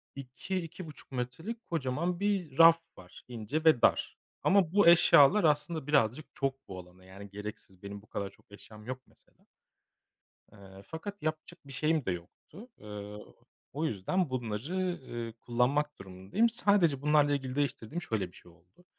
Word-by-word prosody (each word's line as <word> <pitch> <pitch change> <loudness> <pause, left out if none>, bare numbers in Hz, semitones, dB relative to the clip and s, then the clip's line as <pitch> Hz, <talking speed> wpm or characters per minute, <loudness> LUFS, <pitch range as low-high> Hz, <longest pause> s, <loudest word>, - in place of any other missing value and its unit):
2-2.5 155 +5 -7
metrelik 135 - -5
kocaman 165 +3 -1
bir 195 -8 -1
raf 165 0 +8 0.2
var: 90 - -14
ince 120 +6 -4
ve 155 -7 +6
dar. - - +2 0.3
Ama 190 -4 +3
bu 205 -3 +5
eşyalar 170 +2 +7
aslında 150 -1 +1
birazcık 145 -1 +2
çok 135 -1 -3
bu 95 -1 -7
alana, 90 +1 -15
yani, 100 +2 -11
gereksiz. 100 -2 -9
Benim 100 0 -7
bu 110 - -22
kadar 100 -1 -3
çok - - -23
eşyam 105 +1 -14
yok 130 +1 -5
mesela. - - -27 1.1
Iıı, 95 0 -14
fakat 200 +4 -7
yapacak 155 +3 -4
bir - - -10
şeyim 155 +1 +1
de - - 0
yoktu. 90 - -10
Iıı, 105 0 -9 0.4
o 150 +4 -1
yüzden 155 - -1
bunları, 125 - -3 0.3
ııı, 115 -1 -5
kullanmak 125 +6 0
durumundayım. 95 - 0
Sadece 200 - +2
bunlarla 150 0 +4
ilgili 135 -2 -2
değiştirdiğim 145 +2 -2
şöyle 105 - -2
bir - - -21
şey 90 - -17
oldu. 90 - -26
135 Hz, 150 wpm, -31 LUFS, 105-165 Hz, 1.1 s, raf